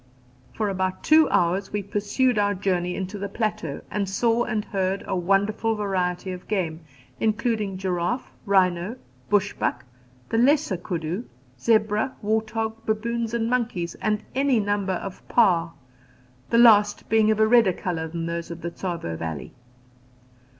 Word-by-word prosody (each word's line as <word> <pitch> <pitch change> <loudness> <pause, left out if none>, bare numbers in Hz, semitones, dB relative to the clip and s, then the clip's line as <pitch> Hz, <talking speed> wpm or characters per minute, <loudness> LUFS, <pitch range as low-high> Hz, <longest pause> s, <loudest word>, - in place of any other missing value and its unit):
For 215 - 0
about 190 -1 -2
two 310 -1 +5
hours 180 +3 +1
we 205 -1 -2
pursued 210 +4 +1
our 205 0 +2
journey 180 -2 -1
into 195 +2 -4
the 200 0 -4
plateau, 215 -8 -3
and 200 -1 -1
saw 230 +4 +2
and 210 -1 -2
heard 195 0 -1
a - - -2
wonderful 200 +5 +1
variety 185 -3 -1
of 180 -1 -8
game, 175 -6 -1 0.4
including 220 -3 0
giraffe, 185 +6 -2 0.2
rhino, 185 +1 +2 0.3
bush 205 -1 +2
buck, 120 - -2 0.4
the 225 - +1
lesser 270 - +3
kudu, 175 +4 -4 0.3
zebra, 220 - +2
wart 220 +1 0
hog, 225 0 -3
baboons 230 +1 -1
and 225 -1 0
monkeys, 230 -9 -1
and 215 -1 0
any 270 -2 +2
number 205 -2 0
of 185 +1 -5
paa, 175 -8 +3 0.8
the 230 - +3
last 210 -3 +5
being 220 -1 +3
of 215 0 +2
a 220 - +6
redder 225 -3 +5
colour 165 -3 -3
than 165 +1 -4
those 170 0 -4
of 170 0 -7
the 170 - -4
Tsavo 170 - -4
valley. 80 -4 -5
205 Hz, 150 wpm, -24 LUFS, 180-220 Hz, 0.8 s, a